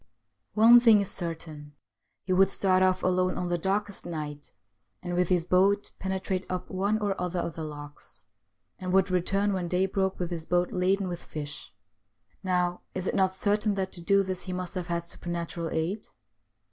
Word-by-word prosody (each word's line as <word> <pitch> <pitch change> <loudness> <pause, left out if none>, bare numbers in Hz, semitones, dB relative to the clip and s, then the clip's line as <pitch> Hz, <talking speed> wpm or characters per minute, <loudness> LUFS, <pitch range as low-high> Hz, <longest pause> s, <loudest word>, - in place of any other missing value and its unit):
One 230 +3 +8
thing 225 -3 +6
is 200 - -1
certain: 160 -4 -6 0.5
he 185 - -1
would 190 +1 +5
start 185 -1 +2
off 185 0 +2
alone 185 0 +1
on 180 - -2
the 175 - +1
darkest 200 +3 -1
night, 150 -3 -6 0.5
and 175 - -4
with 180 0 +1
his 175 -3 +2
boat 195 +3 +2
penetrate 190 0 -2
up 185 0 -4
one 200 +3 +1
or 205 -2 0
other 180 0 -2
of 170 - -3
the 160 - -6
lochs, 145 -6 -10 0.5
and 185 -1 -3
would 190 0 +3
return 195 +3 +1
when 180 -2 -2
day 180 +2 +1
broke 190 0 -1
with 180 -1 -3
his 165 -2 -5
boat 175 0 +1
laden 190 +2 +1
with 175 -1 -5
fish. 145 -2 -7 0.7
Now, 180 -1 0
is 185 -1 -3
it - - -1
not 190 -1 +2
certain 210 +1 +1
that 190 -1 -2
to 175 - -2
do 200 +3 +3
this 185 -1 -4
he 185 - -4
must 180 -1 -4
have 180 -3 -4
had 170 -1 -1
supernatural 170 -1 -5
aid 175 +8 -2
185 Hz, 185 wpm, -28 LUFS, 170-195 Hz, 0.7 s, One